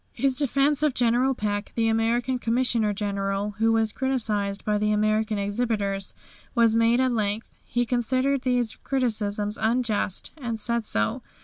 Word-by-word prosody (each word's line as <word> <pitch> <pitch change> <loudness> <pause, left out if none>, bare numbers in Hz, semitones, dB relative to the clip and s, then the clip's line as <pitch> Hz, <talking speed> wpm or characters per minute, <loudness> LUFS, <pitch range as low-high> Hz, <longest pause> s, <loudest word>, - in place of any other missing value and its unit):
His 270 -1 +1
defence 280 +1 +1
of 300 -4 +2
General 245 +2 +2
Peck, 205 -2 -3
the 230 -1 +1
American 235 +3 +1
Commissioner 230 -2 +1
General, 200 0 -2
who 225 0 +3
was 225 -1 +1
criticised 215 -7 -1
by 210 -1 +1
the 210 0 +1
American 215 +1 +1
exhibitors, 200 -2 -1 0.4
was 230 -2 +4
made 230 +1 +3
at 260 -1 +2
length. 215 -1 -2
He 240 0 0
considered 255 +3 +1
these 245 -3 0
criticisms 215 -5 -1
unjust, 220 -4 0
and 235 -6 -4
said 235 0 -1
so. 105 - -1
225 Hz, 145 wpm, -25 LUFS, 210-245 Hz, 0.4 s, was